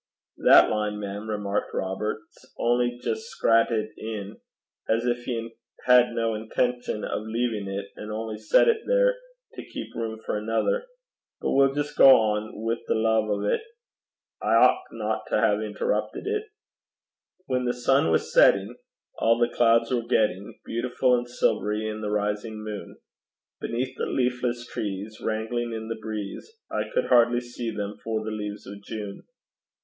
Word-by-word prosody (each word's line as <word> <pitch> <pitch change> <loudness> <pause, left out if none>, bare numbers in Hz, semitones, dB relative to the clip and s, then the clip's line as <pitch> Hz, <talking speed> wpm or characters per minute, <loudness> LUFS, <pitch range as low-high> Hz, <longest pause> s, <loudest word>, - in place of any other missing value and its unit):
'That - - +7
line, 105 -1 -1
mem,' 105 +1 -5
remarked 105 -1 -2
Robert, 100 +3 -2
''s - - -21
only 120 +1 +1
jist 445 +1 -3
scrattit 115 -1 +3
in, 110 -1 -6 0.5
as 115 +1 +2
gin 120 0 +2
he 115 -2 -3 0.3
had 125 -1 +6
no 115 -1 0
intention 115 +1 -1
o' - - -2
leavin' 110 -1 -2
't, 100 +1 -4
an' 105 - -8
only 110 0 -4
set 110 - +4
it 450 -1 +3
there - - +4 0.4
to - - -8
keep - - -8
room 110 -1 -4
for 105 - -1
anither. 295 - 0 0.5
But - - -1
we'll 135 0 +4
jist 145 0 -2
gang - - +10
on 110 -4 +4
wi' 115 +1 0
the - - +1
lave 110 -1 +2
o' 100 -1 0
't. - - +1 0.8
I - - -4
ouchtna - - +2
to - - +1
hae - - +1
interruppit - - -2
it.' 430 +1 -2 1.0
When 125 -1 -1
the 120 - +2
sun 125 -3 +2
was 80 - 0
setting, 100 +5 +4 0.4
All 115 +1 +4
the 120 0 +2
clouds 115 0 +3
were 125 -2 +1
getting 100 -3 0
Beautiful 125 +2 +1
and 120 0 -3
silvery 110 -2 0
in 110 0 -4
the 105 - -2
rising 105 +1 -2
moon; 105 -1 -7 0.6
Beneath 125 +3 -3
the - - -2
leafless 125 -1 -1
trees 105 0 -5
Wrangling 115 +2 -2
in 110 0 -5
the 115 - -4
breeze, 105 - -6 0.2
I - - -2
could - - +1
hardly 120 0 +5
see 120 -1 -5
them 105 -1 -5
for 110 -1 -2
the 110 - -4
leaves 105 -1 -5
of 100 +1 -9
June. 105 -1 -7
110 Hz, 160 wpm, -26 LUFS, 105-120 Hz, 1.0 s, gang